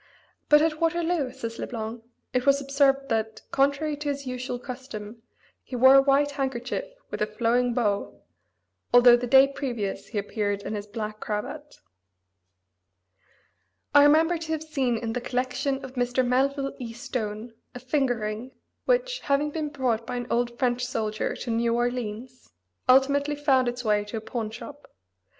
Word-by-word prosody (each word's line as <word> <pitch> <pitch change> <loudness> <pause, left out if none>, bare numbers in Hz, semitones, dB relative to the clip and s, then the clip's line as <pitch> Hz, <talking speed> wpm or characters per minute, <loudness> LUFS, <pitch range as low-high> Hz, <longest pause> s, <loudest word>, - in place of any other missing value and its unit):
"But 295 0 +7
at 315 -1 0
Waterloo," 330 -3 +1
says 230 -2 -6
Le - - -3
Blanc, 225 0 -5 0.3
"it 250 +1 0
was 275 0 +5
observed 275 0 +2
that, 220 -1 -1
contrary 280 +2 +1
to 295 0 -3
his 280 -1 -3
usual 250 -1 -4
custom, 245 -4 -8 0.4
he 255 - -8
wore 260 +2 +7
a 275 - +8
white 280 +1 +3
handkerchief 270 - -3 0.3
with - - -5
a 210 - +2
flowing 235 +2 +1
bow, 205 -5 -1 0.7
although 245 0 +8
the 245 +1 -2
day 270 +2 +7
previous 240 -8 -4
he 220 - -6
appeared 205 0 -2
in - - -4
his 205 -1 -5
black 215 0 -5
cravat." 285 +8 -5 2.2
I 290 - +8
remember 320 +4 +4
to 320 -1 -6
have 315 -1 -3
seen 270 -6 0
in 225 0 -3
the 245 - -2
collection 260 +2 -2
of 260 - -10
Mr. 245 0 0
Melville 275 +2 +1
E. 235 -3 -6
Stone 225 -1 -5 0.2
a - - -5
finger 260 -1 0
ring, 215 +4 -5 0.3
which, - - +1
having 290 +1 0
been 305 -1 -3
brought 245 -6 -1
by - - -3
an 245 0 -3
old 240 0 0
French 245 -1 0
soldier 220 -4 -2
to 240 - -5
New 230 +1 +1
Orleans, 245 0 -3 0.4
ultimately 280 +3 +4
found 270 -3 +2
its 245 0 -3
way 210 -1 +2
to 210 +2 -5
a - - -4
pawn 225 -1 -4
shop. 290 +6 -11
250 Hz, 165 wpm, -26 LUFS, 230-280 Hz, 2.2 s, a